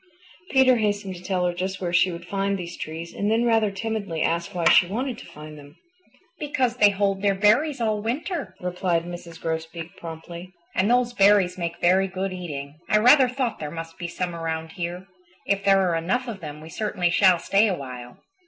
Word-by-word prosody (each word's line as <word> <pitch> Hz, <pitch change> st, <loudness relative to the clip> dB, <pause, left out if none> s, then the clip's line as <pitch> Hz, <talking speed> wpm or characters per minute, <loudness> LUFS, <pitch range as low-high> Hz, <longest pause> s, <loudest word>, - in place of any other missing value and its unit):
Peter 260 Hz, -2 st, +5 dB
hastened 205 Hz, -3 st, -1 dB
to 175 Hz, -, -11 dB
tell 180 Hz, -1 st, -1 dB
her 175 Hz, -, 0 dB
just 190 Hz, +2 st, -3 dB
where 175 Hz, -2 st, -3 dB
she 180 Hz, +1 st, +4 dB
would 170 Hz, 0 st, -8 dB
find 195 Hz, +2 st, -1 dB
these 175 Hz, -1 st, -7 dB
trees 165 Hz, +2 st, -7 dB
and 205 Hz, -, -1 dB
then 225 Hz, +2 st, +2 dB
rather 225 Hz, -2 st, +3 dB
timidly 200 Hz, -5 st, -3 dB
asked 170 Hz, +4 st, -1 dB
why 170 Hz, -2 st, -1 dB
she 175 Hz, -, +6 dB
wanted 245 Hz, +6 st, -3 dB
to -, -, -12 dB
find 150 Hz, 0 st, -11 dB
them. 145 Hz, +1 st, -15 dB, 0.6 s
"Because 255 Hz, -4 st, -1 dB
they 210 Hz, -3 st, +6 dB
hold 195 Hz, -1 st, 0 dB
their 200 Hz, -1 st, +2 dB
berries 235 Hz, +9 st, +3 dB
all 215 Hz, -2 st, 0 dB
winter," 240 Hz, -, -3 dB
replied 180 Hz, -1 st, -1 dB
Mrs. 175 Hz, -1 st, -9 dB
Grosbeak 165 Hz, +1 st, -5 dB
promptly, 170 Hz, +2 st, -9 dB, 0.2 s
"and 190 Hz, +3 st, +1 dB
those 245 Hz, 0 st, +2 dB
berries 195 Hz, -4 st, +4 dB
make 170 Hz, -1 st, -4 dB
very 190 Hz, +2 st, +4 dB
good 190 Hz, 0 st, -3 dB
eating. 150 Hz, -5 st, -7 dB
I 210 Hz, -, +5 dB
rather 250 Hz, +4 st, +6 dB
thought 250 Hz, -2 st, -2 dB
there 150 Hz, -, -4 dB
must 165 Hz, +1 st, -8 dB
be 175 Hz, -, -4 dB
some 175 Hz, 0 st, -3 dB
around 160 Hz, -1 st, -4 dB
here. 175 Hz, 0 st, -5 dB, 0.4 s
If 200 Hz, 0 st, 0 dB
there 195 Hz, -1 st, +4 dB
are 170 Hz, -, +1 dB
enough 215 Hz, +11 st, -1 dB
of 220 Hz, -4 st, -5 dB
them 150 Hz, -3 st, -8 dB
we 160 Hz, -, -10 dB
certainly 180 Hz, -2 st, -1 dB
shall 185 Hz, -1 st, +5 dB
stay 200 Hz, +5 st, +3 dB
a 190 Hz, -, 0 dB
while." 125 Hz, -3 st, -9 dB
185 Hz, 200 wpm, -24 LUFS, 170-210 Hz, 0.6 s, she